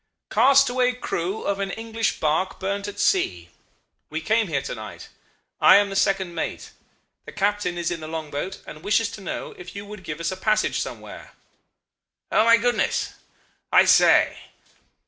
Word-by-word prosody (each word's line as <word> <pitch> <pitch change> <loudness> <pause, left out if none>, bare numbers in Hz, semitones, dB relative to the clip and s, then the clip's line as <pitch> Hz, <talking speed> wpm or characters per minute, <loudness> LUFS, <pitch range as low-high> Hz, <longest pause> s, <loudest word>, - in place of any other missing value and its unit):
"'Castaway 255 -2 +4
crew 195 -5 -3
of 200 0 -1
an 195 -1 -2
English 225 +1 -2
barque 160 +5 0
burnt 200 +1 -3
at 205 0 -8
sea. 90 - +1 0.6
We 155 - -3
came 220 +6 +1
here 140 -5 -1
to - - -5
night. 110 -2 -9 0.5
I - - +7
am 200 0 +4
the - - -5
second 195 -3 +1
mate. 165 - -5 0.5
The - - -9
captain 205 -3 -1
is 170 0 -1
in 170 - -3
the 155 - -8
long 160 -2 -5
boat, 160 +7 -5
and 155 - -10
wishes 210 +4 +1
to 210 - -9
know 190 - -5
if 180 +1 -10
you 200 0 -6
would 205 -2 -10
give 150 -1 -6
us 170 +2 -2
a - - -4
passage 215 +3 +1
somewhere.' - - -8 1.0
"'Oh, - - +4
my 230 0 +7
goodness! 240 +1 0 0.6
I - - +6
say... - - +5
195 Hz, 170 wpm, -23 LUFS, 170-215 Hz, 1.0 s, I